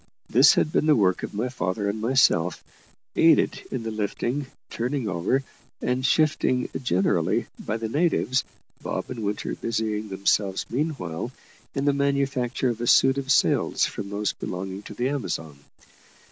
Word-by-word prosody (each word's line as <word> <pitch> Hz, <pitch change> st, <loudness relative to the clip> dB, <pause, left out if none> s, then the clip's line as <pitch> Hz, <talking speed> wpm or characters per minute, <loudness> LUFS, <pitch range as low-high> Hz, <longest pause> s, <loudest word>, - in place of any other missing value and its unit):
This 130 Hz, +5 st, +6 dB
had 155 Hz, -, +1 dB
been 155 Hz, -, +1 dB
the 155 Hz, -, +6 dB
work 95 Hz, -4 st, +2 dB
of -, -, -6 dB
my 115 Hz, +5 st, -1 dB
father 100 Hz, -3 st, -2 dB
and 105 Hz, +2 st, -2 dB
myself, 110 Hz, -9 st, +2 dB, 0.5 s
aided -, -, +4 dB
in 125 Hz, -, -4 dB
the 115 Hz, -, -3 dB
lifting, 120 Hz, +6 st, -2 dB, 0.2 s
turning 125 Hz, +1 st, -2 dB
over, 95 Hz, +9 st, 0 dB, 0.4 s
and 125 Hz, +1 st, -1 dB
shifting 130 Hz, -2 st, +2 dB
generally 95 Hz, -7 st, +1 dB, 0.2 s
by 110 Hz, -, -2 dB
the 115 Hz, 0 st, -3 dB
natives, 140 Hz, -1 st, +1 dB, 0.4 s
Bob -, -, -4 dB
and 125 Hz, -, -5 dB
Winter 105 Hz, 0 st, -2 dB
busying 110 Hz, -2 st, -2 dB
themselves 95 Hz, 0 st, 0 dB
meanwhile 120 Hz, -, -3 dB, 0.4 s
in 135 Hz, 0 st, -1 dB
the 145 Hz, -, +4 dB
manufacture 135 Hz, -3 st, 0 dB
of 120 Hz, -1 st, -3 dB
a 120 Hz, -, -2 dB
suit 135 Hz, +3 st, +5 dB
of 135 Hz, 0 st, -2 dB
sails -, -, +3 dB
from 100 Hz, -1 st, -5 dB
those 105 Hz, 0 st, -1 dB
belonging 95 Hz, +1 st, -5 dB
to 105 Hz, -, -10 dB
the 120 Hz, +4 st, 0 dB
Amazon. 80 Hz, -, -4 dB
115 Hz, 155 wpm, -25 LUFS, 100-135 Hz, 0.5 s, This